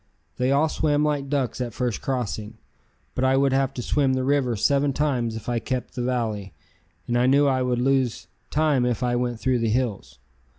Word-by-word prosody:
They 125 +1 +1
all 145 +3 +3
swam 150 -1 +1
like 145 -2 -1
ducks 135 -4 -1
at 120 -3 -4
first 125 -4 -2
crossing, 115 -5 -3 0.6
but 130 - -2
I 130 0 +3
would 135 -1 +3
have 135 0 +2
to 125 - -4
swim 135 0 +1
the 130 0 0
river 135 -3 +1
seven 140 +6 +2
times 125 -6 0
if 110 - -8
I 120 -1 0
kept 125 +2 -4
the 125 - -4
valley, 110 -7 -2 0.5
and 120 +1 +2
knew 140 +2 +5
I 130 -2 +2
would 125 -1 0
lose 130 -2 +1 0.2
time 150 -4 +2
if 125 -1 0
I 120 -1 +1
went 120 -1 -1
through 130 -1 +1
the 115 -1 0
hills. 110 - -2
125 Hz, 200 wpm, -24 LUFS, 120-135 Hz, 0.6 s, knew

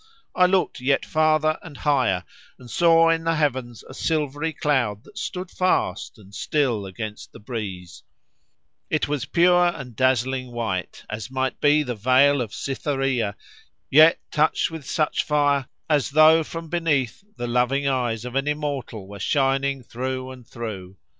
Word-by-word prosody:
I 180 - +4
looked 185 -6 0
yet 135 +2 +1
farther 155 0 +2
and 155 -5 -11
higher, 130 -11 +1 0.3
and 125 -2 -13
saw 165 -1 +5
in 165 0 0
the 165 0 +1
heavens 130 -6 -2
a - - -11
silvery 150 +1 -1
cloud 125 -9 0
that 210 - -11
stood 180 -1 -5
fast 180 - -1
and 100 -2 -17
still 120 -4 -1
against 105 +2 -7
the - - -12
breeze: 100 -6 -6 0.9
it 155 - 0
was 145 -3 -2
pure 175 +3 +4
and 130 -9 -5
dazzling 130 0 +1
white, 95 -6 -4
as 110 +1 -6
might 130 0 -2
be 150 +1 +4
the 125 -3 -3
veil 130 +5 +4
of 115 -4 -4
Cytherea, 135 -6 -2 0.6
yet 155 +4 +7
touched 155 +3 +1
with 160 -4 -8
such 155 -2 +1
fire, 145 -3 +1 0.2
as 150 -4 +1
though 155 +2 +6
from 165 +1 -7
beneath 160 - -1
the 120 - -3
loving 125 +4 +1
eyes 120 -4 -1
of 125 - -6
an 135 +2 -1
immortal 145 -9 -3
were 100 0 -10
shining 135 +3 0
through 130 +2 -4
and 125 -3 -13
through. 100 -5 -7
135 Hz, 155 wpm, -23 LUFS, 120-155 Hz, 0.9 s, yet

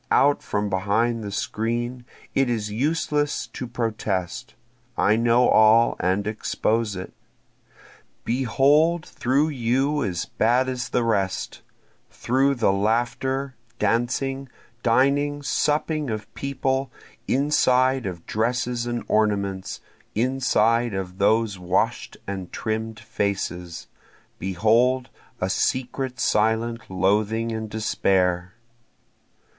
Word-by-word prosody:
out 145 +1 +4
from 105 0 -2
behind 105 +4 0
the 100 - -4
screen! 120 +4 -2 0.3
It 135 -2 +2
is 110 -3 -2
useless 145 +4 0
to 125 - -7
protest, 110 -2 -3 0.4
I 105 - +4
know 120 +2 +4
all 110 +2 +5
and 95 +3 0
expose 110 0 -1
it. 90 - -7 1.1
Behold 145 +7 +2
through 140 +5 +1
you 135 +2 0
as 90 -5 -2
bad 125 +4 +2
as 125 -1 -3
the 125 - +1
rest, 100 -5 -1 0.5
Through 135 +3 +1
the 115 -5 +2
laughter, 120 +6 0 0.2
dancing, 135 +4 0 0.3
dining, 140 +4 +2
supping, 150 0 0
of 110 -1 -5
people, 135 -1 -2 0.4
Inside 130 -3 +2
of 85 -3 -7
dresses 120 +2 -1
and 120 0 -2
ornaments, 100 -3 0 0.3
inside 120 -2 +2
of 95 0 -5
those 110 -1 +2
wash'd 90 +1 -1
and 95 -2 -5
trimm'd 110 0 -3
faces, 95 -5 -3 0.5
Behold 115 +7 +2 0.3
a 95 - 0
secret 130 +5 -1
silent 115 +1 +1
loathing 105 +5 +1
and 110 -1 -4
despair. 95 -4 0
115 Hz, 105 wpm, -24 LUFS, 105-130 Hz, 1.1 s, all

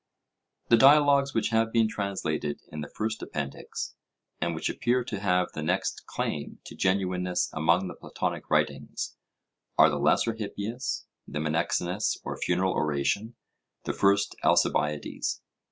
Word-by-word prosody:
The 115 - +7
dialogues 140 +1 +6
which 115 - +1
have 115 0 +2
been 115 -1 +4
translated 100 -8 -2
in 75 - -5
the 75 - -5
first 110 +1 -3
Appendix, 70 -2 -5 0.5
and 85 -1 0
which 80 - -2
appear 125 +1 +1
to 110 -5 -4
have 90 -2 +1
the 75 - -4
next 90 +5 -1
claim 75 - -3
to - - -9
genuineness 90 -1 0
among 85 +4 +2
the - - -6
Platonic - - -4
writings, - - -1 0.6
are - - +7
the - - -1
Lesser 115 - +3
Hippias, 110 +3 -4 0.2
the - - -5
Menexenus 85 +5 0
or - - -4
Funeral 95 0 +1
Oration, 75 - 0 0.5
the - - -2
First 100 0 +2
Alcibiades. 75 0 +1
95 Hz, 135 wpm, -28 LUFS, 80-115 Hz, 0.6 s, The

